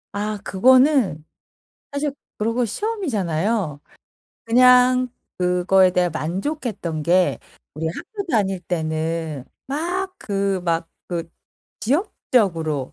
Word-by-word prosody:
아 210 +1 -2
그거는 255 - +4 0.7
사실 285 +1 -1 0.3
그러고 230 +3 +1
시험이잖아요. 210 - -1 0.7
그냥 250 +1 +5 0.3
그거에 180 +1 +4
대해 180 -1 +2
만족했던 185 - -3
게 180 +3 +3 0.4
우리 160 +2 -3
학교 400 - -5
다닐 195 -5 +1
때는 160 -3 -2 0.2
막 355 +7 -2
그 195 -2 -1
막 165 -1 0 0.2
그 170 -2 -4 0.5
지역적으로 195 - 0
195 Hz, 205 characters per minute, -22 LUFS, 170-255 Hz, 0.7 s, 그냥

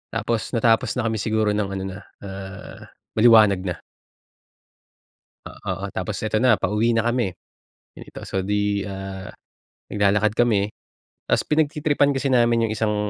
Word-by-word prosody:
tapos 115 +1 -2
natapos 115 +1 +2
na 125 - -1
kami 110 - -2
siguro 110 0 +1
ng 105 -1 -1
ano 95 - -4
na, 95 +1 -6 0.2
ah, 95 0 -8 0.4
maliwanag 110 -5 +6
na. 90 - -2 1.7
O - - -12 0.2
oo 100 +1 -4
tapos 95 +2 -3
eto 110 - -1
na 125 -3 +5
pauwi 105 +4 +1
na 115 - +2
kami 120 -2 +1 0.7
dito, - - -11
so 95 0 -1
'di, 105 0 0
ah, 95 -1 -7 0.6
naglalakad 105 +1 +2
kami 105 -4 +2 0.6
ta's - - +2
pinagtritripan 150 -2 +2
kasi 135 +1 -1
namin 120 -2 +3
yung 110 - -2
isang 110 -1 0
105 Hz, 140 wpm, -23 LUFS, 100-120 Hz, 1.7 s, maliwanag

